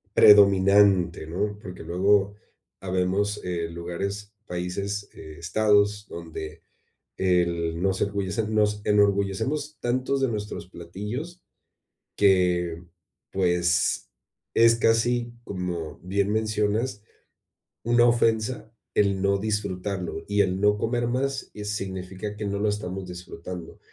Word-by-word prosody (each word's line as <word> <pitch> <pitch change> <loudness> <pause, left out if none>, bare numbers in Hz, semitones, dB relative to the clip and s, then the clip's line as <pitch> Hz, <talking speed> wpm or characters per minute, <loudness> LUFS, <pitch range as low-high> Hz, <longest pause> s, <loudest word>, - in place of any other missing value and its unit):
predominante, 100 -4 +6
¿no?, 105 +5 -2
porque 90 -2 -9
luego 100 +4 +2 0.5
habemos, 95 +2 0
eh, 85 -2 -3
lugares, 100 +5 -5
países, 100 +3 -3
estados, 105 +6 +1
donde 80 -1 -8 0.6
el 85 -2 +1
nos 95 -1 0
ergullecemos, 100 +2 -1
nos 105 -1 +1
enorgullecemos 105 +9 +1
tantos 130 +3 0
de 135 - +3
nuestros 105 -4 -4
platillos 105 - -7 0.7
que, 90 -3 +2 0.5
pues, 85 -2 +1 0.5
es 115 0 +6
casi, 120 +1 +2
como 90 -6 -5
bien 100 +3 -1
mencionas, 105 0 0 0.8
una 120 +1 +4
ofensa 115 -1 +1 0.3
el 100 -2 +2
no 100 0 +2
disfrutarlo, 100 -3 -3
y 100 0 +2
el 95 -1 0
no 105 0 +3
comer 120 +2 -1
más, 135 +3 -2
eh, 105 - -7
significa 95 0 -4
que 105 0 -5
no 100 0 -2
lo 105 - +1
estamos 95 -2 -3
disfrutando. 90 -1 -8
100 Hz, 110 wpm, -25 LUFS, 90-105 Hz, 0.8 s, predominante